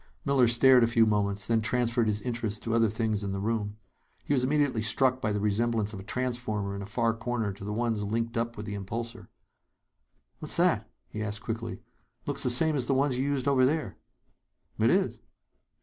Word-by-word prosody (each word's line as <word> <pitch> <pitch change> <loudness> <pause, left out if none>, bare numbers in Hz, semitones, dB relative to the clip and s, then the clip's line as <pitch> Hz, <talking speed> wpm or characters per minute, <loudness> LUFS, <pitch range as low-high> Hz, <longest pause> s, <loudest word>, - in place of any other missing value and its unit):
Miller 135 -3 +4
stared 125 +1 +6
a - - +4
few 115 -1 +4
moments; 100 -1 +1
then 115 -1 +2
transferred 120 0 +1
his 105 -1 -1
interests 115 -4 -2
to 115 - -3
other 115 -1 +3
things 110 -1 -1
in 100 -1 -3
the 100 - -3
room. 105 0 -2 0.5
He - - 0
was 130 -3 +2
immediately 140 -4 +1
struck 130 +4 +2
by 105 - 0
the 105 - -1
resemblance 105 +1 0
of 100 - -6
a - - -9
transformer 110 -4 -2
in 100 - -5
a 100 - -7
far 115 +1 0
corner 115 -2 -2
to 100 - -11
the 105 - -4
ones 115 -1 -1
linked 115 +3 -2
up 115 0 -2
with 105 - -6
the 105 - -5
impulsor. 115 +4 -5 1.1
"What's - - -2
that?" - - +2 0.2
he 110 - -6
asked 105 0 -4
quickly. 115 0 -5 0.4
"Looks - - -2
the - - +1
same 155 +6 +4
as 130 -4 -1
the 135 - +2
ones 135 -1 +1
you - - +1
used 140 -2 -1
over 135 -2 +4
there." 140 -6 0 0.8
"It - - +4
is." - - +1
115 Hz, 205 wpm, -28 LUFS, 105-125 Hz, 1.1 s, stared